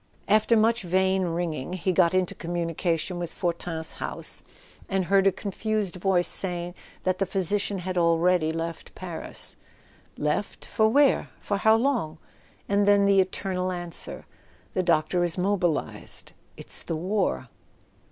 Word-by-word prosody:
After 215 +2 +4
much 225 +2 +3
vain 190 +1 +2
ringing 170 -3 -2
he 185 0 0
got 180 0 +4
into 185 -1 +1
communication 170 +1 -2
with 175 -1 -4
Fortin's 170 -2 -3
house, - - -4 0.5
and 190 -1 +1
heard 195 +1 +4
a - - +6
confused 205 -1 -2
voice 180 -1 +2
saying 175 -2 -1 0.3
that 185 -1 0
the 195 - +2
physician 200 +2 0
had 185 0 -2
already 170 -1 +3
left 165 0 -5
Paris. 175 -3 -6 0.6
"Left—for 205 +7 0
where? 280 +3 +4
For 200 - -1
how 220 +2 +5
long?" 225 - 0 0.5
And 200 0 +2
then 200 -1 +5
the 200 -1 +5
eternal 185 0 -2
answer: 175 -1 -4 0.5
"The 185 - +1
doctor 175 0 +2
is 175 -2 0
mobil¬ 180 -3 +2 0.2
ised. - - -5 0.3
It's - - -3
the 165 - -3
war." 180 - -1
185 Hz, 140 wpm, -26 LUFS, 170-200 Hz, 0.6 s, a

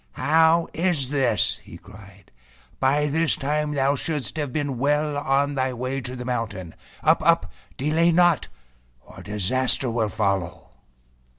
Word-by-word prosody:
"How 160 +2 +3
is 165 -7 0
this?" 135 -4 +1
he - - -12
cried! - - -16 0.2
" - - -30
By 145 +3 +2
this 160 +2 +1
time 150 +1 -1
thou 140 0 +1
shouldst 150 -1 -3
have 145 -4 -2
been 140 -3 -3
well 150 +2 +1
on 140 0 +1
thy 130 -1 -1
way 130 +3 -3
to 125 0 -6
the 125 -1 -7
mountain. 105 -9 -4 0.3
Up! - - +4
Up! - - +2 0.3
delay 160 +5 +2
not, 175 -2 +3 0.5
or - - -14
disaster 120 +5 0
will 115 -2 0
follow!" 100 -4 -2
140 Hz, 150 wpm, -23 LUFS, 125-150 Hz, 0.5 s, Up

